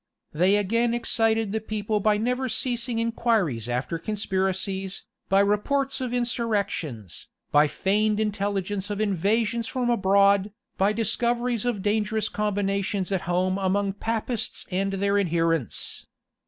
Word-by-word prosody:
They 180 +6 +3
again 230 +4 +1
excited 225 -2 +1
the 220 +1 -1
people 215 0 -2
by 210 +1 +3
never 250 +4 -1
ceasing 235 +1 -1
inquiries 225 - 0
after 125 +7 -2
conspiracies, 190 -1 -2 0.3
by 195 +1 +5
reports 265 +7 +1
of 250 -2 -2
insurrections, 205 - -2 0.2
by 150 +1 +5
feigned 210 +6 +1
intelligence 205 -2 -1
of 205 -1 -3
invasions 215 +3 +1
from 245 -2 0
abroad, 200 -1 +3 0.2
by 195 +2 +2
discoveries 235 +1 0
of 225 -6 -1
dangerous 215 +1 0
combinations 200 -2 -1
at 185 -3 -2
home 185 +2 +1
among 195 +1 +1
Papists 225 +2 -2
and 195 +2 0
their 200 +1 +1
adherents. 165 - -1
205 Hz, 125 wpm, -25 LUFS, 190-225 Hz, 0.3 s, by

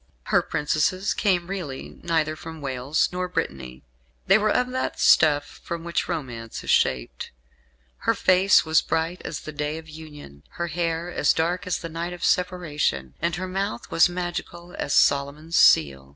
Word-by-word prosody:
Her - - +6
princesses 160 +6 0
came 185 -4 +1
really 170 -8 -6
neither 160 -2 0
from 160 0 -9
Wales 135 +1 0
nor 180 0 -2
Brittany. 65 - -4 0.4
They 195 +3 +5
were 215 0 +1
of 250 +3 +1
that 260 0 -3
stuff 145 -2 +3
from 170 -1 -5
which 170 0 -2
romance 120 -9 -5
is - - -1
shaped. - - 0 0.7
"Her - - 0
face 185 0 +4
was 160 0 +3
bright 165 +2 -2
as 150 - -5
the 155 - -7
day 150 +1 -3
of 160 0 -10
union; 150 - -12 0.2
her 170 0 -2
hair 170 +1 -2 0.2
dark 175 +3 -1
as 185 - 0
the 165 - -6
night 165 +2 -5
of 175 - -4
separation; 150 - 0
and 170 - 0
her 185 +1 -4
mouth 195 +5 -4
was 165 - +5
magical 175 0 -5
as 140 - -1
Solomon's 145 +4 +2
seal." 70 -3 +4
165 Hz, 165 wpm, -24 LUFS, 145-180 Hz, 0.7 s, Her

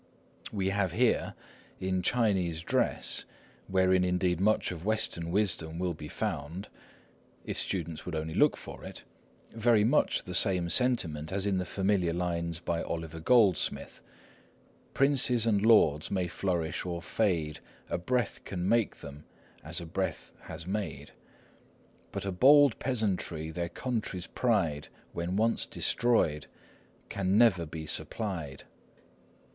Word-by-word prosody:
We 95 -2 -1
have 95 -3 0
here, 120 +3 +1 0.4
in 95 0 -1
Chinese 95 -7 +1
dress, - - 0 0.4
wherein 95 -1 +3
indeed 90 -1 +1
much 110 0 +2
of 85 -2 -7
Western 100 -5 0
wisdom 85 -4 0
will 90 0 -1
be 75 -1 -9
found, 80 +7 -4 0.8
if - - -4
students 85 -4 -3
will 85 -3 -4
only 80 +1 -4
look - - +3
for - - -10
it, - - -9 0.5
very 115 -1 +3
much 130 +8 +2
the 90 - -7
same 90 -3 +2
sentiment 80 -10 0
as 100 +1 -1
in 100 -2 +1
the 90 - -3
familiar 95 -3 +1
lines 85 -1 -2
by 85 -1 -2
Oliver 80 -1 -5
Goldsmith:— 100 -2 +2 0.9
"Princes 130 -4 +3
and 105 -3 +2
lords 80 -10 +4
may 95 -2 -1
flourish 85 -2 -2
or 85 -1 -4
may - - -14
fade,— 85 -9 0 0.3
A - - -2
breath 120 +4 -1
can 90 -2 -3
make 115 0 +1
them, 70 +2 -10 0.4
as 85 +3 -1
a 85 - -7
breath 95 +3 -3
has 80 - -8
made; 95 -3 -4 1.0
But 100 -1 -5
a 95 - -1
bold 140 +6 +6
peasantry, 95 -10 -2
their 85 +1 -3
country's 110 -7 -3
pride 85 -12 0 0.3
When 85 +2 -3
once 115 +3 +1
destroyed, 75 - +1 0.6
can 95 0 0
never 95 -8 +4
be 80 0 -7
supplied." 80 -4 -4
90 Hz, 135 wpm, -30 LUFS, 85-105 Hz, 1.0 s, bold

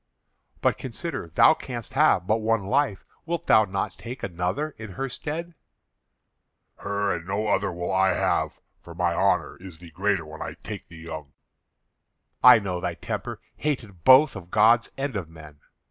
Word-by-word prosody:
"But - - +1
consider; 130 - -5
thou 85 - +5
canst 120 -6 -7
have 135 - +3
but 110 +3 +2
one 115 -1 +1
life. 130 -3 0 0.2
Wilt 170 -1 -2
thou 110 0 +5
not 95 0 -4
take 120 +3 -8
another 95 - -2
in 110 -4 -8
her 135 +8 -3
stead?" 160 +6 -5 1.2
"Her 100 0 -1
and 85 0 -6
no 100 +2 -1
other 105 - +1
will 90 +2 -3
I 95 -1 +3
have, - - 0 0.3
for 85 - -12
my 90 -1 +1
honour - - +1
is 90 -2 -11
the 85 0 -13
greater 95 0 0
when 80 +1 -10
I - - -5
take - - -7
the 85 - -13
young." 80 -3 -8 1.1
"I 125 -1 +10
know 95 -4 -3
thy - - -2
temper, - - -5 0.2
hated 110 - -3
both 130 +2 +7
of 90 -3 -9
gods 110 +3 +4
and 135 -2 -3
of 90 -5 -4
men. 75 -2 -14
100 Hz, 170 wpm, -25 LUFS, 85-125 Hz, 1.2 s, I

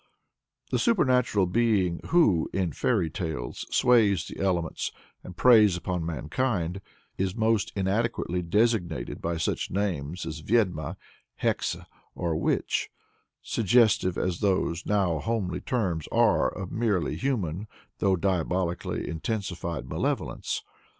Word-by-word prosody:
The - - +1
supernatural 125 - +3
being 95 -3 +1
who, 105 - +3
in 95 -4 0
folk 90 - 0
tales, 80 -8 -4
sways 105 -8 +4
the - - -9
elements 90 -4 -1 0.3
and 90 - -10
preys 110 -7 +6
upon 90 -1 -3
mankind, 85 - -2 0.4
is 95 -1 0
most 110 -2 +1
inadequately 100 -2 0
designated 90 - 0
by 85 0 -2
such 80 - -1
names 90 -5 -2
as 80 -1 -5
Vyed'ma, 95 -5 0 0.5
Hexe, - - 0 0.3
or 85 -2 -1
Witch, - - 0 0.5
suggestive 110 -4 +3
as 90 -2 -1
those 95 -4 0
now 95 -6 +1
homely 100 -6 -2
terms 90 - -1
are 115 -3 +3
of 95 -3 -7
merely 105 -8 0
human, 105 - -2 0.3
though 95 -2 +3
diabolically 90 -1 -1
intensified 85 - -3
malevolence. - - -2
95 Hz, 115 wpm, -27 LUFS, 85-110 Hz, 0.5 s, preys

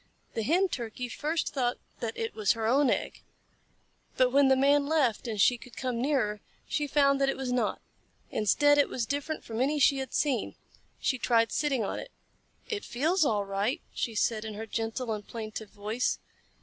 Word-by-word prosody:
The 225 - -1
Hen 345 - +3
Turkey 245 -2 -4
first 310 +6 -2
thought 250 -3 0 0.2
that 230 -2 -4
it 225 - -3
was 215 -2 +2
her 225 -1 -3
own 265 +4 +4
egg, - - -1 1.0
but 255 -1 +4
when 280 +1 +5
the 265 - +5
Man 280 +2 +3
left 275 -8 +1
and 220 -3 -3
she 245 +4 +4
could 240 -2 -14
come 250 -3 -2
nearer, 240 -7 0 0.3
she 295 -1 -1
found 280 -1 +3
that 275 - +3
it - - -1
was 265 -2 -3
not. 250 -1 0 0.5
Instead, 290 +8 +4
it 285 - +4
was 240 - -2
different 285 +4 -3
from 225 +1 -4
any 290 +3 +2
she 280 0 +4
had 265 - -3
ever - - -7
seen. 265 -7 0 0.4
She 255 - 0
tried 230 -1 +3
sitting 275 -6 +1
on - - -3
it. - - -8 0.6
"It 420 -3 -3
feels 320 +9 +1
all 210 -5 +1
right," 195 +5 -1
she 230 - -3
said 215 0 +1
in 215 -1 -6
her 220 +2 -5
gentle 225 +2 -2
and 210 -1 -6
plaintive 220 -2 -6
voice. 215 +4 -1
250 Hz, 195 wpm, -29 LUFS, 225-280 Hz, 1.0 s, when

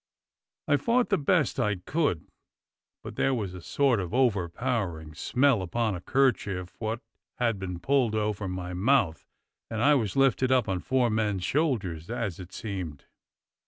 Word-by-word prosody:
I 145 - +4
fought 235 - +1
the 195 - +3
best 150 -1 +1
I 105 -1 +1
could, 95 - -1 0.8
but - - -8
there 135 - +2
was 100 -6 -3
a 90 - -8
sort 130 +4 +2
of 90 +3 -3
over 105 -9 +2
powering 85 -8 -3
smell 130 - +2
upon 110 +4 -1
a 90 - -5
'kerchief 105 -8 0
wot 110 0 -3 0.3
had 115 -5 0
been 90 -2 -4
pulled 130 -2 +2
over 105 -2 -1
my 90 -1 -4
mouth, 95 -4 +1 0.4
and 110 - -3
I 145 +6 +5
was 115 -9 0
lifted 135 -1 +3
up 130 -3 +3
on 95 -2 -1
four 125 +2 +1
men's 105 -4 0
shoulders, 100 - -1
as 115 -7 -3
it 90 0 -9
seemed. 95 -9 -6
110 Hz, 160 wpm, -28 LUFS, 90-130 Hz, 0.8 s, I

